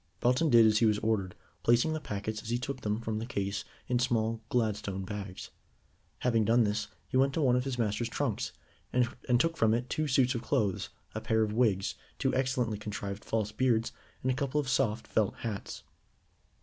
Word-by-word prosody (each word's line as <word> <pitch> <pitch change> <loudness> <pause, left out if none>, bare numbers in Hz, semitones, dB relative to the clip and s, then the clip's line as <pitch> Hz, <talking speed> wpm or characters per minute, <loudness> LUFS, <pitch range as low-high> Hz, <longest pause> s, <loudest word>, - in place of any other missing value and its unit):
Belton 130 +7 +3
did 115 -3 +7
as 110 0 +4
he 115 - +5
was 105 -1 +3
ordered, 105 -4 0 0.3
placing 120 +7 +3
the 155 - -2
packets 105 -4 -4
as 110 - -8
he 120 - +1
took 130 +1 -4
them 105 +2 -1
from 110 -1 -2
the 115 - -3
case 100 -5 -2 0.2
in 125 -1 +1
small 115 -3 +1
Gladstone 105 -5 -1
bags. 100 -2 -6 0.7
Having 115 -3 +2
done 115 +2 +5
this, 105 0 -1 0.2
he - - 0
went 135 +1 +3
to 160 - +1
one 125 -2 +4
of 125 +1 +1
his 135 -2 -2
master's 115 0 0
trunks, 125 -4 -1 0.4
and 125 0 +3 0.3
took 165 +4 +1
from 110 -4 +4
it 120 +2 -3
two 155 0 0
suits 130 -1 +3
of 120 - -3
clothes, 100 -5 0 0.2
a - - -4
pair 110 0 +2
of 105 -1 -1
wigs, 105 -5 +2 0.2
two - - 0
excellently 125 -5 0
contrived 100 -1 -5
false 110 -2 -1
beards, 115 -1 +1 0.3
and 130 - +2
a - - 0
couple 140 +2 0
of 145 - -2
soft 120 -4 +1
felt 110 -3 +1
hats. 110 -4 -5
115 Hz, 200 wpm, -31 LUFS, 105-125 Hz, 0.7 s, did